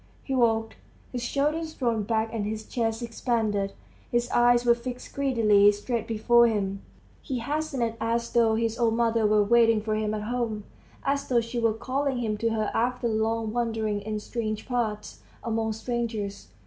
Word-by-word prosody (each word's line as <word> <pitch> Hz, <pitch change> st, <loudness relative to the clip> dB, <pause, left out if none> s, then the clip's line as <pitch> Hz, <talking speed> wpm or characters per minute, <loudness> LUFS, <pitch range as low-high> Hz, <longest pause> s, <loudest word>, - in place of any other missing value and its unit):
He 270 Hz, -, -4 dB
walked, 225 Hz, -3 st, +1 dB, 0.3 s
his 245 Hz, -, -4 dB
shoulders 300 Hz, +6 st, -1 dB
thrown 235 Hz, -4 st, 0 dB
back 220 Hz, +1 st, -1 dB
and 220 Hz, -3 st, -2 dB
his 215 Hz, +1 st, -4 dB
chest 225 Hz, -1 st, -2 dB
expanded; 220 Hz, -4 st, -1 dB, 0.4 s
his 240 Hz, 0 st, 0 dB
eyes 240 Hz, 0 st, +4 dB
were 240 Hz, -, +6 dB
fixed 245 Hz, +1 st, -7 dB
greedily 220 Hz, -7 st, +4 dB
straight 225 Hz, +2 st, -3 dB
before 235 Hz, +2 st, +4 dB
him. 200 Hz, -3 st, -1 dB, 0.4 s
He 265 Hz, -4 st, -3 dB
hastened 270 Hz, -2 st, -2 dB
as 235 Hz, +1 st, -1 dB
though 230 Hz, -2 st, +3 dB
his 230 Hz, +1 st, -1 dB
old 230 Hz, -2 st, +2 dB
mother 230 Hz, -2 st, +2 dB
were 210 Hz, 0 st, +4 dB
waiting 230 Hz, +1 st, +4 dB
for 215 Hz, 0 st, -2 dB
him 215 Hz, 0 st, -1 dB
at 210 Hz, -, -4 dB
home, 225 Hz, -2 st, -2 dB, 0.4 s
as 280 Hz, 0 st, 0 dB
though 245 Hz, -2 st, +3 dB
she 230 Hz, +1 st, -3 dB
were 230 Hz, -1 st, +2 dB
calling 265 Hz, +3 st, -1 dB
him 220 Hz, -3 st, -1 dB
to 230 Hz, +1 st, +1 dB
her 220 Hz, -1 st, -1 dB
after 245 Hz, +1 st, 0 dB
long 220 Hz, 0 st, 0 dB
wanderings 225 Hz, -3 st, -1 dB
in 215 Hz, 0 st, -3 dB
strange 215 Hz, -1 st, -4 dB
parts, 220 Hz, -4 st, -2 dB, 0.2 s
among 225 Hz, -1 st, -1 dB
strangers. 220 Hz, -3 st, -3 dB
230 Hz, 170 wpm, -27 LUFS, 215-240 Hz, 0.4 s, were